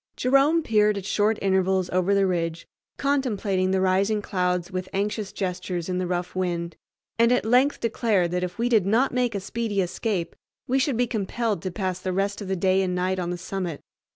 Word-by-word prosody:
Jerome 275 +6 +3
peered 210 -4 +3
at 195 - -5
short 210 +2 +1
intervals 190 -1 +2
over 185 +2 +2
the 200 0 +3
ridge, 170 -2 -2 0.3
contemplating 215 -9 0
the 190 0 +2
rising 195 +3 +2
clouds 180 -3 -1
with 185 0 -4
anxious 205 +1 -2
gestures 180 -2 -3
in 180 0 -1
the 185 - -1
rough 180 0 -3
wind, 170 -2 -2 0.4
and 230 +1 +5
at 250 - +2
length 250 +5 +3
declared 215 -6 +1
that 180 0 -1
if 180 -1 -4
we 235 +1 +1
did 220 -6 +3
not 235 +7 +2
make 245 -3 0
a - - 0
speedy 210 +1 -3
escape 185 0 -2 0.3
we 265 +2 +2
should 265 -2 +1
be 245 - +3
compelled 220 -2 -2
to 185 - -3
pass 185 -1 -3
the 185 0 -3
rest 200 +2 -1
of 200 - -6
the 190 - 0
day 190 +1 +2
and 180 -1 -1
night 185 +1 0
on 175 -1 -2
the 175 - -3
summit. 180 -3 -4
195 Hz, 205 wpm, -25 LUFS, 180-220 Hz, 0.4 s, and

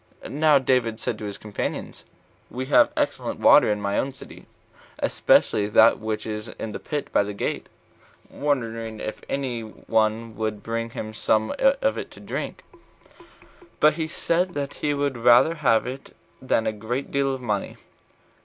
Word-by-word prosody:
Now 150 +1 +4
David 125 -4 +1
said 110 - -3
to 105 - -6
his 100 -1 -5
companions, 105 -1 -5 0.4
"We 130 +1 -4
have - - +7
excellent - - -1
water - - +6
in 105 - -1
my 100 0 -1
own 135 0 -2
city, 135 - -12 0.5
especially 105 -1 +2
that 110 +2 +5
which 110 -1 -3
is 105 0 -5
in 110 - -7
the - - -6
pit 150 -1 -4
near - - +4
the 100 0 -6
gate," - - -3 0.6
wondering 115 -6 -2
if 110 - -5
any 130 -4 -2
one 110 0 -1
would 110 -1 -3
bring 115 0 -3
him 110 -1 -6
some 110 0 +1
of - - +2
it - - -6
to - - -14
drink; - - -5 1.2
but 150 0 +5
he 160 0 -3
said 175 +2 -1
that 140 -1 -3
he 145 -1 -1
would 140 -3 -1
rather 120 +7 +6
have 125 -9 +2
it 130 +2 -8 0.3
than 120 -3 +1
a 110 - +1
great 115 +6 -4
deal 140 0 +1
of - - -8
money. 105 -5 -3
115 Hz, 165 wpm, -24 LUFS, 110-140 Hz, 1.2 s, have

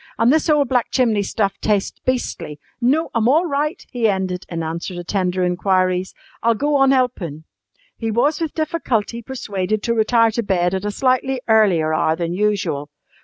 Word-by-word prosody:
An' 230 +3 +4
this 315 +2 +2
ole 295 -2 +4
black 250 -3 0
chimney 225 -5 +2
stuff 200 0 -1
tastes 205 -2 0
beastly. 240 -12 -3 0.2
No, 290 +7 +1
I'm 230 -1 +1
all 315 +6 +4
right," 300 +3 -2
he 240 -3 +1
ended, 190 -2 -2
in 165 -2 -3
answer 170 +3 -4
to 175 - -5
tender 185 0 -1
inquiries. 185 0 0 0.3
"I'll 230 0 +3
go 290 +6 0
on 270 -1 +4
helpin'." 220 - 0 0.5
He 225 - -3
was 265 +9 +1
with 320 -3 -3
difficulty 250 -8 -1
persuaded 215 -5 -3
to 235 - +1
retire 230 0 +3
to 235 - -1
bed 180 -4 0
at 190 +1 -2
a - - 0
slightly 255 +4 0
earlier 190 -8 +3
hour 155 0 +2
than 170 0 -3
usual. 180 -8 -1
215 Hz, 175 wpm, -20 LUFS, 185-255 Hz, 0.5 s, An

